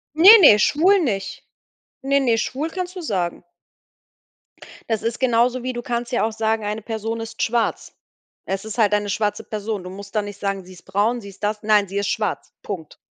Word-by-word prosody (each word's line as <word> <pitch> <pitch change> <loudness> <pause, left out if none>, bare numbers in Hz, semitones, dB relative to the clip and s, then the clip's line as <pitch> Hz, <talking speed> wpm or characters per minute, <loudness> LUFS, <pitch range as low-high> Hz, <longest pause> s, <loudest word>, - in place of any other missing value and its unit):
Ne, 380 +8 +10
ne, 215 - +8
schwul 355 - +4
nicht. 205 - -3 0.6
Ne, 275 +1 +2
ne, 240 -4 +2
schwul 290 +8 -2
kannst 365 0 -5
du - - -4
sagen. 185 - -2 1.5
Das 225 -2 -1
ist 230 +2 -3
genauso 245 0 +2
wie, 255 0 -3
du 240 - -4
kannst 240 0 -3
ja 240 - +1
auch 225 - -1
sagen, 220 0 -1
eine 210 +1 -3
Person 225 +1 -4
ist 225 0 -6
schwarz. 230 0 -1 0.5
Es 195 +1 -3
ist 220 +2 -7
halt 210 -2 +3
eine 205 -1 0
schwarze 210 +1 -1
Person. 210 -2 -4
Du 180 - -7
musst 200 +2 -10
dann 210 - +1
nicht 205 0 -9
sagen, 195 -1 -2
sie 185 - -13
ist 180 - -16
braun, 210 +5 0
sie 200 - -11
ist 195 +1 -10
das, 210 +1 -2
nein, 210 -1 +3
sie 200 +1 -4
ist 200 - -1
schwarz. 215 -1 -3
Punkt. 170 -7 -7
220 Hz, 205 wpm, -21 LUFS, 205-240 Hz, 1.5 s, Ne